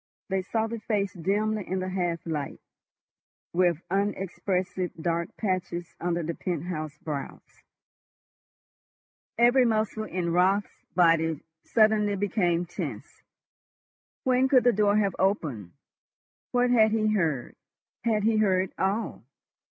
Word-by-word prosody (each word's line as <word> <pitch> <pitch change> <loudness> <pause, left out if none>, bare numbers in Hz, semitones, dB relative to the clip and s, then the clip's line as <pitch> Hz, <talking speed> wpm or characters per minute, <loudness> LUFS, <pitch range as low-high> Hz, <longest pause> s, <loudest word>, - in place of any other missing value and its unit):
They 190 0 +1
saw 220 +4 -1
the 230 +1 -4
face 205 -3 -1
dimly 205 +4 -1
in 190 - -1
the 185 0 -2
half 175 -3 -2
light, 150 -4 -4 0.9
with 175 -2 +2
unexpressive 190 -2 -1
dark 170 +1 -2
patches 175 -4 -2
under 175 0 -1
the 165 +2 -2
penthouse 155 -3 -4
brows. 145 -2 -7 1.8
Every 245 +2 +5
muscle 220 -2 0
in 175 -4 -2
Raut's 190 +3 +1
body 165 -3 +3 0.2
suddenly 215 -2 +3
became 185 -4 +1
tense. 175 - -7 1.0
When 255 0 +3
could 255 -2 +5
the 245 - +5
door 205 0 +3
have 200 -3 +1
opened? 145 - -1 0.8
What 245 0 +2
had 220 -3 +5
he 215 -1 +1
heard? 160 - -1 0.5
Had 220 -3 +1
he 220 0 +3
heard 190 -3 +2
all? 200 - -1
190 Hz, 120 wpm, -27 LUFS, 170-215 Hz, 1.8 s, Every